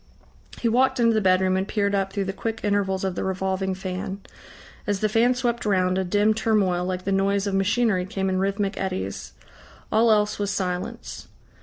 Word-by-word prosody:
He 235 - 0
walked 260 +3 +2
into 230 -1 +4
the 220 - +2
bedroom 185 -1 +3
and 190 +1 -1
peered 205 -2 0
up 195 -1 0
through 200 -1 -2
the 195 - -3
quick 225 +2 -4
intervals 200 -2 0
of 190 -1 -1
the - - -3
revolving 190 0 -1
fan. 190 0 -5 0.7
As 205 -1 0
the 215 - +2
fan 230 +4 +3
swept 240 -2 -1
round, 185 -2 +1
a - - +1
dim 205 +4 +2
turmoil 205 -5 +1
like 180 0 -3
the 195 - -2
noise 195 +1 +1
of 200 - -2
machinery 195 -1 +1
came 195 -1 -2
in 185 0 0
rhythmic 200 +1 -1
eddies. 95 - -4 0.6
All 225 +1 +4
else 210 0 +2
was 205 -1 -1
silence. 180 -2 -4
195 Hz, 190 wpm, -24 LUFS, 190-215 Hz, 0.7 s, into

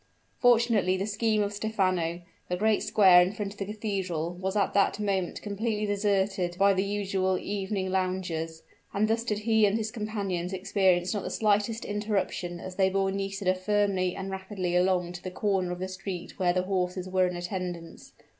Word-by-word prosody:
Fortunately 230 -6 +4
for 190 - -1
the - - -2
scheme 215 0 +1
of 205 0 -3
Stephano, 185 -5 0 0.3
the 180 - -1
great 215 +2 +2
square 185 -4 +6
in 180 +3 +1
front 205 -1 -4
of 205 - -19
the 195 - -2
cathedral 190 -6 -3
was 190 +2 -3
at 200 -2 +1
that 200 +1 +2
moment 195 -4 -1
completely 210 +1 -2
deserted 195 -3 0
by 200 +1 +5
the 190 0 +1
usual 195 -2 0
evening 195 -1 -3
loungers; 180 -4 -2 0.3
and 210 +2 +2
thus 225 +1 +1
did 215 -3 -1
he 220 -1 +4
and 200 +2 +1
his 220 -1 -3
companions 200 -5 -3
experience 185 -1 +2
not 205 - -2
the - - -4
slightest 215 +1 +1
interruption 205 -4 -2
as 185 +1 -8
they 190 -1 +4
bore 195 0 +1
Nisida 195 -1 -1
firmly 190 -1 0
and 195 0 -5
rapidly 190 -2 -3
along 180 -1 +2
to 175 - -9
the 185 - -4
corner 185 -1 0
of 180 - -3
the 185 +1 -3
street 185 -1 -7
where 180 -2 +3
the 180 +1 0
horses 185 -1 -1
were 185 0 +2
in 180 - -4
attendance. 175 -2 -6
190 Hz, 185 wpm, -28 LUFS, 185-205 Hz, 0.3 s, square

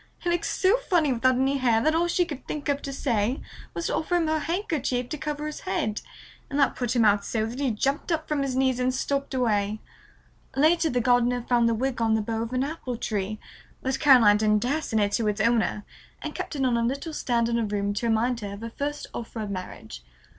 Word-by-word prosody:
He 350 - -2
looked 345 -1 0
so 390 +5 +3
funny 340 - +1
without 255 +2 +3
any 270 +2 +1
hair 235 -3 +3
that 310 +7 +2
all 335 +2 +2
she 350 +1 +2
could 295 -6 -8
think 295 -2 -4
of 285 0 0
to 275 - -5
say 245 -3 0 0.4
was 335 - -3
to - - -1
offer 355 +3 -1
him 340 -2 +2
her 315 0 +1
handkerchief 295 - -2
to 305 - -4
cover 300 0 -3
his 305 0 -5
head, 345 - -2 0.5
and 280 - -3
that 280 - +3
put 245 -1 -2
him 235 -2 +4
out 205 -1 +4
so 220 +1 -1
that 235 +4 -6
he 280 -2 +1
jumped 275 +9 -1
up 315 -1 -1
from 300 -2 0
his 270 -2 -1
knees 260 -1 +2
and 255 0 +1
stalked 275 0 -2
away. 215 -4 +1 0.8
Later 320 +4 +3
the 245 -3 +1
gardener 245 0 +2
found 235 -2 +3
the 230 - +1
wig 255 +1 -2
on 225 -1 +3
the 220 - +1
bough 225 +1 -2
of 230 +1 -4
an 255 +1 0
apple 275 -5 -4
tree, 215 -2 -3 0.4
but 265 0 -1
Caroline 245 -8 +7
didn't 210 0 +2
dare 285 +6 0
send 220 -7 0
it 200 - 0
to 220 +1 0
its 210 0 -1
owner 220 -2 +1 0.4
and - - -4
kept - - -5
it 270 -2 0
on 245 -2 +2
a - - +1
little 275 +7 -2
stand 235 -5 0
in 235 0 0
her 230 - 0
room 205 -1 -1
to 220 +4 -2
remind 230 +2 +1
her 200 -2 -5
of 200 - -9
her 230 0 -6
first 290 +4 -4
offer 230 0 -6
of 210 -2 -4
marriage. 185 - -7
250 Hz, 240 wpm, -26 LUFS, 225-290 Hz, 0.8 s, Caroline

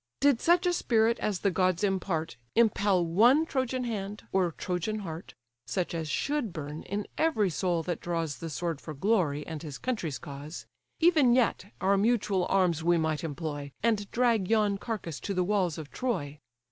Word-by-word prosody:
Did 280 -4 +3
such 350 +2 +4
a 355 - +3
spirit 230 -7 +2
as 205 -4 -1
the 200 - +2
gods 185 +1 +1
impart 180 - -1 0.2
Impel 205 -5 +3
one 235 - +5
Trojan 260 -3 -1
hand 210 -3 -4
or 185 -3 +2
Trojan 185 +6 -3
heart, 165 -2 -7 0.3
(Such 180 -3 -2
as 160 -2 -3
should 280 - -1
burn 150 -1 -6
in 205 +2 -4
every 220 - +2
soul 175 -1 0
that 175 -1 -3
draws 165 -4 -2
The 165 - -5
sword 165 -1 -3
for 155 - -7
glory, 155 -5 +1
and 160 -3 -6
his 150 -4 -7
country's 195 - -2
cause) 145 +3 -8 0.3
Even 315 -7 +5
yet 240 -6 +2
our 195 +2 +3
mutual 200 -3 +2
arms 180 -5 +2
we 175 +1 +4
might 160 -1 -1
employ, 145 -2 -4
And 215 -3 +1
drag 235 -6 +2
yon 210 -3 +2
carcase 195 -10 -4
to 200 - -4
the 180 - +2
walls 185 -4 0
of 155 -3 -8
Troy. 150 - -3
190 Hz, 175 wpm, -29 LUFS, 165-225 Hz, 0.3 s, one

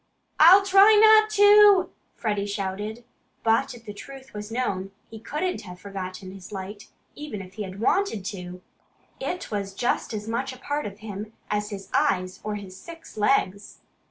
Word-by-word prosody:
"I'll 370 +5 +8
try 395 +2 +7
not 435 0 +7
to!" 410 -2 +6 0.2
Freddie 205 -3 -2
shouted. 205 +3 -4 0.4
But 225 +2 +1
if 230 -1 -15
the 210 - -7
truth 265 +5 -12
was 210 +1 -7
known, 195 -6 -2 0.2
he 220 - -9
couldn't 310 +10 -3
have 180 -2 -11
forgotten 185 -1 -7
his 190 0 -12
light, 205 +1 -7 0.3
even 295 -8 -7
if 185 -1 -10
he 215 - -7
had 190 -1 -6
wanted 235 - 0
to! 180 -2 -7 0.6
It 360 -8 -4
was 200 -2 -4
just 240 - -1
as 215 -1 -5
much 230 +3 -2
a - - -12
part 290 +2 -3
of 200 +1 -11
him 210 0 -7 0.2
as 210 0 -1
his 195 -2 -8
eyes 185 0 0
or 210 0 -3
his 195 -3 -9
six 330 - -12
legs. 205 -3 0
210 Hz, 170 wpm, -25 LUFS, 195-285 Hz, 0.6 s, I'll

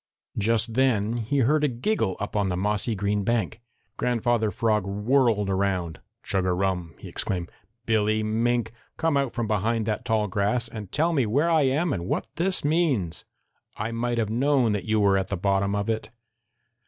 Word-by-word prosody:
Just 115 +2 +1
then 120 -3 +2
he 130 +5 0
heard 150 +4 +2
a - - +4
giggle 125 - -1
up 100 - -5
on 100 -2 +1
the 90 - -1
mossy 105 +3 0
green 100 +1 0
bank. 115 +1 -1 0.4
Grandfather 120 -2 +1
Frog 105 -2 0
whirled 105 +1 +2
around. 95 -4 -1 0.2
"Chug 95 -2 0
a 90 -1 +1
rum!" 90 -4 -1
he - - -10
exclaimed. 90 -2 -3 0.3
"Billy 110 -1 +2
Mink, 115 +2 0 0.3
come 160 -2 +1
out 140 -3 0
from 120 -2 -1
behind 110 +2 0
that 110 -1 -2
tall 110 -2 +1
grass 105 +5 0
and 105 -4 -8
tell 165 +3 +1
me 135 -7 +2
where 145 +10 +2
I 160 -2 +4
am 150 +4 +1
and 85 0 -4
what - - -1
this 185 -1 0
means! 145 - 0 0.5
I 110 +2 -3
might 120 +1 -1
have 110 -2 0
known 130 -1 +2
that 105 -3 -2
you 110 0 +1
were 100 -1 +4
at 95 - -3
the 100 - -3
bottom 100 +2 +1
of 100 0 -1
it." 110 -2 -2
110 Hz, 185 wpm, -25 LUFS, 100-120 Hz, 0.5 s, a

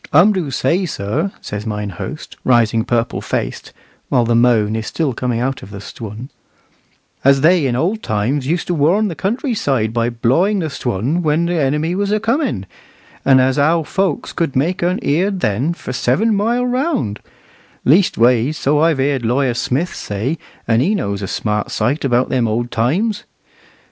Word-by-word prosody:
"Um 180 +8 +6
do 180 -7 -2
say, 165 +8 0
sir," 145 - -2
says 105 +1 -5
mine 105 -2 -3
host, 150 - -7
rising 115 -3 +3
purple 120 -1 -1
faced, - - -4 0.4
while 120 -2 +3
the 120 - +1
moan 115 -3 +3
is 110 -1 -3
still 155 -6 -1
coming 120 -1 -2
out 130 +2 -2
of - - -11
the 100 - -8
Stwun, 110 +4 -8 0.9
"as 135 0 +4
they 175 +5 +5
used 140 -4 0
in 120 - -1
old 185 - 0
times 130 +10 -1
to 180 - -1
warn 175 +8 +2
the - - -4
country 235 - -1
side 135 - 0
by 115 0 +1
blawing 135 - +1
the 160 -5 -2
Stwun 125 - -1
when 160 +1 +1
the 170 -2 0
enemy 150 +5 0
was 200 +2 -1
a 215 - +2
comin', 225 - -1 0.6
and 135 -1 +5
as 130 +1 +2
how 160 +3 +3
folks 190 0 -2
could 165 -6 -1
make 165 +8 0
un 180 +4 +1
heered 185 +6 +1
then 115 +10 0
for 170 - -6
seven 185 - +1
mile 230 +5 +1
round; 250 - -1 0.7
leastways, 130 - +3
so 145 +2 +1
I've 160 -1 +3
heered 135 -1 0
Lawyer 125 +2 +1
Smith 135 +8 -1
say, 115 +10 -3 0.3
and 115 0 +3
he 195 +10 +2
knows 100 - -2
a 95 - -3
smart 105 +2 -2
sight 125 +8 -1
about 125 -1 +2
them 125 -3 +1
old 120 +2 -2
times." 185 - 0
135 Hz, 180 wpm, -18 LUFS, 115-175 Hz, 0.9 s, Um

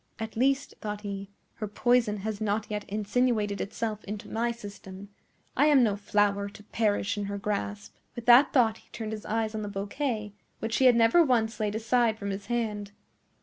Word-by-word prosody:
"At 220 0 -6
least," 275 +4 +1
thought 210 -1 -4
he, 200 -1 -5 0.3
"her 215 - -3
poison 230 0 +2
has 215 -1 -3
not 215 0 0
yet 210 -1 -3
insinuated 210 0 0
itself 215 +1 -3
into 205 0 -7
my 235 +1 0
system. 200 -3 -10 0.5
I 290 - +4
am 285 -4 +6
no 210 -4 +2
flower 200 0 +1
to 210 +1 -14
perish 210 -1 0
in 205 - -2
her 200 0 -4
grasp." 205 0 -3 0.2
With 240 -2 -7
that 245 +4 +7
thought 225 -4 +3
he - - -23
turned 220 -2 -5
his 215 -1 -6
eyes 220 0 -1
on 215 - -3
the 205 - -4
bouquet, 210 +2 -3 0.2
which 225 0 -2
he 265 - +3
had 250 -2 +7
never 230 +9 +5
once 230 -5 +1
laid 210 -1 -1
aside 225 0 +2
from 200 -2 -4
his 195 +1 -6
hand. 215 -4 -2
215 Hz, 190 wpm, -28 LUFS, 205-235 Hz, 0.5 s, that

